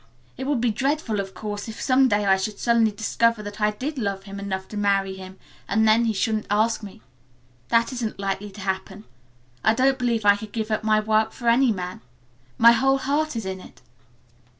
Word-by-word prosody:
It 265 - -5
would 285 -4 +1
be 235 -1 +1
dreadful, 265 -2 -1
of 195 -1 -5
course, 205 -1 -5
if 220 - -8
some 265 0 +3
day 205 -3 +1
I 190 -1 +5
should 200 +2 -3
suddenly 235 -2 +3
discover 220 +1 0
that 205 +1 -8
I 210 - +4
did 260 +7 -5
love 200 -3 -2
him 200 0 -8
enough 190 -1 -4
to - - -8
marry 195 -1 +1
him 190 0 -10 0.3
and 220 +2 +2
then 225 +2 +4
he 225 - +1
shouldn't 215 +1 -1
ask 220 +3 +1
me. 210 +1 -11 0.6
That 230 +2 +2
isn't 235 -4 -4
likely 195 +1 -3
to 200 - -10
happen. 190 +1 -4 0.6
I 220 - +4
don't 265 +2 +2
believe 235 -3 0
I 205 0 +6
could 210 0 -10
give 220 -1 -3
up 215 - -1
my 215 0 +3
work 220 +1 +1
for 240 - -6
any 240 +1 +4
man. 180 -2 -5 0.6
My 235 +1 +8
whole 270 +3 +3
heart 290 +2 -1
is 225 -3 -4
in 190 0 -4
it." - - -16
215 Hz, 210 wpm, -24 LUFS, 200-235 Hz, 0.6 s, My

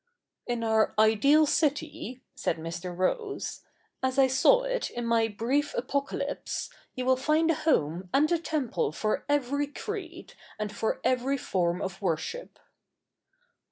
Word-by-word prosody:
' - - -40
In 240 -1 -1
our 220 -1 +2
ideal 225 +9 +5
city,' 295 -3 -1
said 165 - -1
Mr. 165 +2 -6
Rose, 405 - -2 0.2
' - - -39
as 260 +1 0
I 270 - +7
saw 265 - +4
it - - -1
in 240 0 -4
my 230 -1 +3
brief 250 +8 -1
Apocalypse, 275 +3 -2 0.2
you 255 - -3
will 260 0 +5
find 310 +5 +2
a 315 - -2
home 170 - +1
and 300 +4 +3
a 340 - +3
temple 285 - -1
for 215 +7 -1
every 285 0 +1
creed, 350 +2 -7 0.2
and 210 -1 -4
for 220 - -1
every 255 +2 +1
form 180 -7 -1
of 190 +1 -5
worship.' 190 - -3
260 Hz, 150 wpm, -28 LUFS, 215-305 Hz, 0.2 s, I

